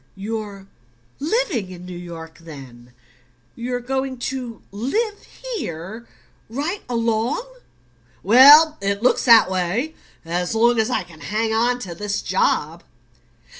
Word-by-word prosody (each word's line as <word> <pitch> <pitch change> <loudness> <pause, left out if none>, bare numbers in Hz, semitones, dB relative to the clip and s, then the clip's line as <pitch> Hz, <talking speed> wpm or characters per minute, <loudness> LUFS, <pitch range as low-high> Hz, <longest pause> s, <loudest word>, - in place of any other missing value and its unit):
"You're 205 -1 -6 0.5
LIVING 300 - -1
in 180 -1 -10
New 180 0 -8
York, 170 -2 -9
then 130 -7 -12 0.6
you're 245 +1 -3
going 265 +1 -3 0.2
to 245 -4 -7
live 410 - -2 0.3
here 195 - -6 0.4
right 300 - -3
along?" 230 - 0 0.8
"Well, 290 - +8
it 200 +2 -1
looks 250 - +2
that 230 -5 +7
way; 190 - -1 0.3
as 175 +4 -2
long 235 +1 +3
as 220 +2 +1
I - - 0
can 165 -3 -16
hang 220 +1 -1
on 240 +2 +2
to 180 -6 -6
this 200 +3 -3
job. - - 0
225 Hz, 125 wpm, -21 LUFS, 180-255 Hz, 0.8 s, Well